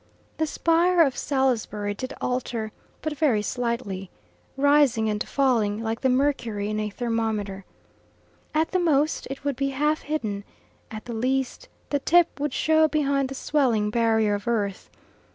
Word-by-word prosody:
The 315 - +1
spire 335 +3 +3
of 270 -4 0
Salisbury 235 -7 0
did 255 +6 -6
alter, 240 -3 -2 0.3
but 310 -1 -2
very 270 -9 +2
slightly, 235 -6 -3 0.5
rising 280 -6 +4
and 210 0 -1
falling 230 -6 +1
like 225 +1 -3
the 265 - +2
mercury 240 -6 0
in 215 - -1
a 215 0 -2
thermometer. 215 -4 -2 0.9
At 315 +1 +1
the 370 - +2
most 310 -3 +1
it 270 0 -6
would 285 -2 -1
be 275 +2 -1
half 300 +3 0
hidden; 215 -10 -3 0.5
at 215 0 -8
the 240 - -5
least 265 - -1 0.2
the 285 - +2
tip 340 +2 +3
would 295 0 -1
show 315 +3 +3
behind 280 -3 +1
the 270 - -6
swelling 245 -8 +1
barrier 220 -2 +2
of 205 +3 -4
earth. 205 -5 -1
255 Hz, 150 wpm, -25 LUFS, 215-290 Hz, 0.9 s, rising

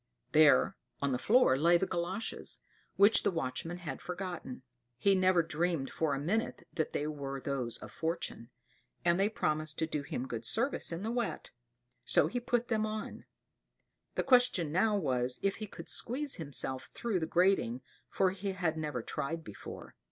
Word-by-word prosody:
There, 150 +1 +6 0.2
on 140 -1 0
the 125 - 0
floor 220 - +4
lay 170 +3 +6
the 190 - 0
galoshes, 185 +5 -3 0.3
which 205 +3 +6
the - - +2
watchman 165 +1 -3
had 170 -4 -6
forgotten; 175 -8 -5 0.3
he 200 +8 +4
never 185 -2 +4
dreamed 160 -2 -1
for 155 -3 0
a - - -3
moment 205 +10 -1
that 155 - -1
they 145 - -1
were 140 -3 -4
those 130 -4 -3
of - - -10
Fortune; 160 -8 -3 0.6
and 170 +1 +4
they 200 +2 +3
promised 155 -6 -1
to 160 - +1
do 150 -2 -2
him 135 -2 -4
good 115 -2 -4
service 235 - 0
in 170 +3 -4
the 225 - -1
wet; 240 -1 -2 0.5
so - - +4
he 245 - -1
put 240 0 0
them 220 -2 +1
on. 215 0 -4 0.9
The - - +1
question 245 - +4
now 205 +5 +3
was, 125 -7 0
if 195 -1 +1
he 215 - -5
could - - -10
squeeze 280 +4 +1
himself 140 -5 -3
through 225 -6 -1
the 160 - -2
grating, 170 -9 +2 0.3
for 190 -1 +2
he 195 +1 -3
had 170 -4 -1
never 145 -6 -3
tried 160 +7 -3
before. 105 - -9
170 Hz, 175 wpm, -32 LUFS, 140-200 Hz, 0.9 s, There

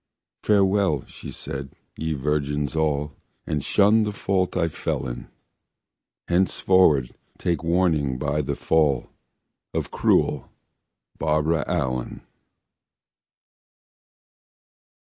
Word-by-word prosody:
"Farewell", 100 -7 +2
she - - -10
said, 70 0 -6 0.2
"ye 80 0 -2
virgins 75 +1 -1
all, 75 -2 0 0.3
And 75 -3 -2
shun 105 +3 +4
the 105 -1 0
fault 95 -2 -1
I 85 -2 +2
fell 75 - -3
in: - - -6 1.0
Henceforward 90 -6 +3 0.2
take 85 -2 -1
warning 80 -6 +1
by 75 +2 -1
the 70 - -3
fall 75 -5 +1 0.6
Of - - -2
cruel - - +1 0.7
Barbara 75 0 +1
Allen." 65 -8 -2
75 Hz, 90 wpm, -24 LUFS, 70-90 Hz, 1.0 s, shun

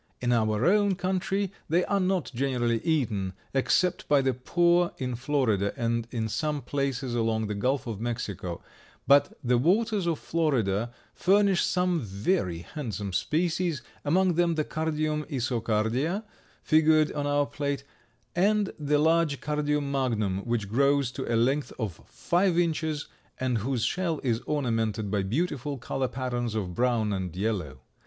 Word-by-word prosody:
In 120 0 0
our 110 0 +1
own 200 +1 +4
country 190 +1 -1 0.2
they 170 +3 +3
are 200 - +1
not 185 -2 0
generally 120 -3 0
eaten, 110 - 0 0.2
except 165 +6 +1
by 145 -2 +4
the 130 -1 +2
poor 175 +7 +2
in 125 -2 -3
Florida 120 -6 0
and 115 0 -1
in 115 -2 -2
some 150 +5 -2
places 135 -3 -2
along 115 -2 0
the 105 - -3
Gulf 130 +7 0
of 110 -3 -5
Mexico, 100 -7 -4 0.4
but 140 0 +4
the 125 -1 +3
waters 200 - +2
of 165 -2 +1
Florida 120 -9 0 0.2
furnish 195 -1 +3
some 180 -2 +1
very 100 - -1
handsome 110 - -4
species, 165 - 0 0.2
among 180 +4 +3
them 170 0 +2
the 155 - +1
Cardium 155 -1 -1
isocardia 120 - 0 0.4
figured 155 -1 +4
on 145 -1 -2
our 145 0 +2
plate, 140 -1 -3 0.5
and 205 +2 +2
the 150 0 +2
large 160 -1 +2
Cardium 150 -1 -1
magnum, 110 -8 0
which 115 -4 -1
grows 140 +3 +2
to 130 -2 -4
a 115 - +3
length 135 +5 +1
of 105 -8 -4
five 175 0 +1
inches 160 -3 0 0.3
and 125 -3 0
whose 120 +2 -1
shell 165 +4 0
is 115 -4 +1
ornamented 115 -7 -1
by 105 -2 +1
beautiful 140 - -2
color 130 +2 -2
patterns 120 -3 -3
of 95 -5 -2
brown 115 -2 +1
and 90 -3 -3
yellow. 95 -9 -2
135 Hz, 150 wpm, -27 LUFS, 115-160 Hz, 0.5 s, own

